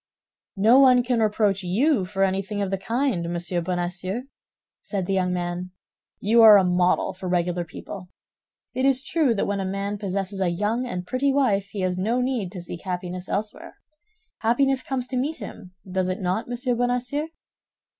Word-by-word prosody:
"No 225 +7 +6
one 255 -2 +6
can 245 -1 0
reproach 210 -2 +2
you 205 - +2
for 195 +1 -1
anything 195 +2 -1
of 200 -1 -1
the 195 - 0
kind, 225 -6 -1
Monsieur 175 0 -1
Bonacieux," 180 +5 -3 0.6
said 195 -4 -3
the 195 - -1
young 185 -1 +1
man; 175 0 -3 0.5
"you 230 +3 +4
are 215 -2 +10
a 195 - +4
model 180 0 +2
for 185 0 -6
regular 175 0 0
people. 180 +2 -9 0.6
It 260 - -1
is 270 -1 +3
true 290 -6 +1
that 195 - 0
when 200 0 -1
a - - -1
man 200 +2 -3
possesses 195 0 -3
a 185 - +2
young 210 +8 -1
and 180 -6 -4
pretty 265 +6 +1
wife, 215 -8 +2
he 200 -1 -5
has 185 0 -1
no 225 +6 +1
need 250 -7 -1
to 180 -3 -7
seek 175 -1 -7
happiness 180 0 -5
elsewhere. 210 +1 -4 0.6
Happiness 260 +4 +2
comes 255 -1 -3
to 255 - -2
meet 290 +6 -1
him, 185 0 -10
does 185 0 -1
it 185 - -2
not, 185 +3 -1
Monsieur 245 +1 -1
Bonacieux?" 245 +5 -1
200 Hz, 180 wpm, -24 LUFS, 180-245 Hz, 0.6 s, are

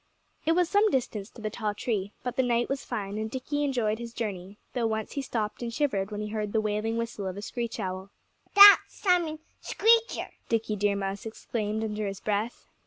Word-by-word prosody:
It 325 - +5
was 355 0 +3
some 415 +4 +4
distance 225 - -2
to 225 - -13
the 215 - -2
tall 210 -1 -2
tree. 205 -3 -2
But 250 - -3
the - - +3
night 240 -1 +1
was 275 0 -2
fine, 210 -3 -4
and 220 0 -3
Dickie 290 +4 -2
enjoyed 235 -6 0
his 235 -1 -7
journey, 200 -3 -4 0.2
though 240 -3 +1
once 220 -1 -2
he 280 - -2
stopped 220 -5 -3
and 235 -1 -3
shivered 220 -8 0
when 210 -1 -4
he 210 - -4
heard 210 -1 -3
the 220 - +3
wailing 215 +1 -1
whistle 230 -4 -3
of 185 +1 -5
a - - -5
screech 235 +1 -4
owl. 185 +1 -4 0.5
"That's 405 0 +11 0.2
Simon 350 -5 +1 0.2
Screecher!" 455 +1 +2 0.2
Dickie 225 -2 0
Deer 205 0 +1
Mouse 195 +2 -3
exclaimed 220 -1 -3
under 210 -1 -2
his 195 -1 -5
breath. 215 +3 -2
220 Hz, 205 wpm, -28 LUFS, 205-250 Hz, 0.5 s, That's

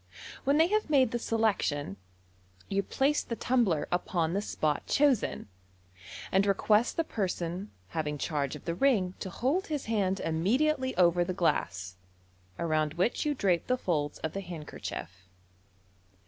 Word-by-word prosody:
When 280 +2 +3
they 320 - +6
have 425 -4 +1
made 265 -5 +4
the 240 - -1
selection, 205 - 0 0.7
you 195 0 +1
place 275 +8 +1
the 230 - -5
tumbler 230 -11 +1
upon 175 -2 0
the 200 - 0
spot 155 -7 -1
chosen, 275 - +2 0.8
and 195 +1 +3
request 210 +3 +2
the 330 - +3
person 185 - -3 0.2
having 150 +1 -2
charge 145 -2 -2
of 150 - -11
the 170 - -1
ring 190 -4 +2
to 190 - -4
hold 285 - 0
his 300 -3 -3
hand 200 -4 0
immedi 215 - +2
ately 260 -2 -3
over 175 -1 +4
the 180 +1 -3
glass, 95 - -1 0.6
around 155 -2 0
which 185 - 0
you 295 - +1
drape 185 -8 +1
the 255 - +2
folds 150 - -1
of 160 - -4
the 195 - -3
hand 170 -5 -7
kerchief. 90 - -7
190 Hz, 155 wpm, -30 LUFS, 160-250 Hz, 0.8 s, they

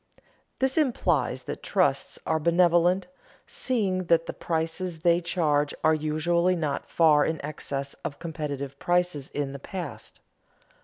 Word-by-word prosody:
This 265 +3 +2
implies 160 - +1
that - - -6
trusts - - 0
are 160 - +1
benevolent, 175 +2 +3 0.4
seeing 195 -8 0
that 165 -1 +3
the - - -5
prices 165 +1 -3
they 170 0 +4
charge 150 -4 +1
are 160 - +5
usually 165 +4 +1
not 150 -5 -2
far 155 -3 +5
in 160 +1 -1
excess 140 -2 -4
of 145 - -4
competitive 140 -4 -5
prices 175 -5 0
in 140 -2 -3
the 140 - -7
past. 180 +5 -7
165 Hz, 135 wpm, -27 LUFS, 150-175 Hz, 0.4 s, are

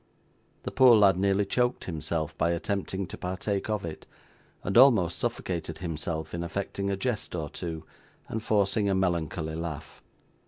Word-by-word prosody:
The - - -4
poor 130 -3 +7
lad 100 -4 +6
nearly 100 +2 +2
choked 125 +4 0
himself 80 -2 -2
by 85 - +1
attempting 95 +2 -2
to - - -9
partake 95 +3 -2
of 105 -4 -1
it, 80 -2 -8 0.6
and 100 - -2
almost 105 -11 +6
suffocated 85 -3 -3
himself 80 -2 -4
in 85 - -3
affecting 100 +2 -3
a 100 - -1
jest 115 -4 -2
or 80 -3 -4
two, 80 -3 -5 0.4
and 110 - -3
forcing 105 -1 +1
a 95 - +2
melancholy 85 -3 -1
laugh. 80 -2 -6
95 Hz, 155 wpm, -28 LUFS, 85-100 Hz, 0.6 s, poor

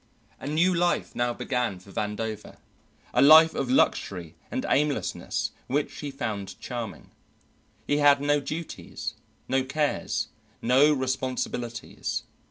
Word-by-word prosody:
A - - -7
new 165 +5 +3
life 175 0 0
now 120 0 +1
began 125 -5 -1
for 90 +2 -15
Vandover, 105 +1 -4 0.6
a - - +4
life 160 +3 +9
of 130 - -2
luxury 90 -9 +1 0.2
and 260 +1 -2
aimlessness 145 0 0 0.2
which 145 +3 0
he 145 - -4
found 110 -7 -4
charming. 120 -3 -6 0.7
He 145 - +1
had 145 -1 +6
no 145 +1 +2
duties, 155 +4 -5 0.3
no 130 0 +2
cares, 145 +3 -1 0.3
no 135 +5 +5
responsibilities. 130 -3 -2
130 Hz, 120 wpm, -27 LUFS, 120-150 Hz, 0.7 s, life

